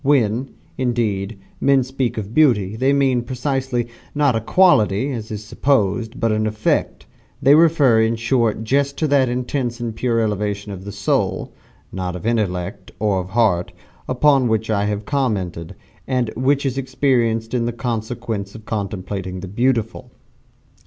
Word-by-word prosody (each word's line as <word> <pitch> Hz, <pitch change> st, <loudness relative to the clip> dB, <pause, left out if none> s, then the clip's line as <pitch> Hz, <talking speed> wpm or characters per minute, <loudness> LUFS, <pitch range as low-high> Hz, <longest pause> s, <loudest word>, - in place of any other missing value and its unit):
When, 130 Hz, -2 st, +2 dB, 0.3 s
indeed, 115 Hz, -5 st, -1 dB, 0.2 s
men 140 Hz, -2 st, +4 dB
speak 130 Hz, -2 st, -2 dB
of 105 Hz, 0 st, -5 dB
Beauty, 110 Hz, -10 st, +3 dB
they 130 Hz, +4 st, +2 dB
mean, 135 Hz, -3 st, +2 dB
precisely, 130 Hz, 0 st, -2 dB, 0.3 s
not 145 Hz, -4 st, +3 dB
a 115 Hz, -, 0 dB
quality, 120 Hz, -, +3 dB
as 115 Hz, -3 st, -5 dB
is 105 Hz, -2 st, -6 dB
supposed, 115 Hz, -2 st, 0 dB
but 115 Hz, -2 st, +1 dB
an 110 Hz, 0 st, +1 dB
effect 110 Hz, 0 st, -1 dB, 0.3 s
they 140 Hz, -, +5 dB
refer, 150 Hz, -8 st, +5 dB
in 110 Hz, +1 st, +2 dB
short, 115 Hz, -1 st, 0 dB
just 140 Hz, +4 st, 0 dB
to 155 Hz, -, +1 dB
that 135 Hz, -3 st, +3 dB
intense 125 Hz, 0 st, -2 dB
and 115 Hz, -2 st, -4 dB
pure 115 Hz, -1 st, 0 dB
elevation 105 Hz, -1 st, -2 dB
of 100 Hz, +1 st, -7 dB
soul 100 Hz, -1 st, -1 dB, 0.4 s
not 90 Hz, -1 st, -4 dB
of 90 Hz, -, -7 dB
intellect, 95 Hz, -5 st, -2 dB
or 100 Hz, -2 st, +1 dB
of 90 Hz, 0 st, -5 dB
heart 95 Hz, -5 st, +1 dB, 0.3 s
upon 135 Hz, 0 st, +3 dB
which 110 Hz, 0 st, 0 dB
I 100 Hz, -1 st, +1 dB
have 105 Hz, 0 st, -2 dB
commented, 95 Hz, -, -2 dB, 0.3 s
and 125 Hz, -4 st, 0 dB
which 140 Hz, +3 st, +1 dB
is 135 Hz, 0 st, -1 dB
experienced 120 Hz, -4 st, 0 dB
in 120 Hz, -1 st, 0 dB
consequence 110 Hz, -3 st, -4 dB
of 110 Hz, -1 st, -11 dB
contemplating 95 Hz, -3 st, -4 dB
the 95 Hz, -, -6 dB
"beautiful." 115 Hz, +2 st, -1 dB
115 Hz, 150 wpm, -20 LUFS, 105-130 Hz, 0.4 s, they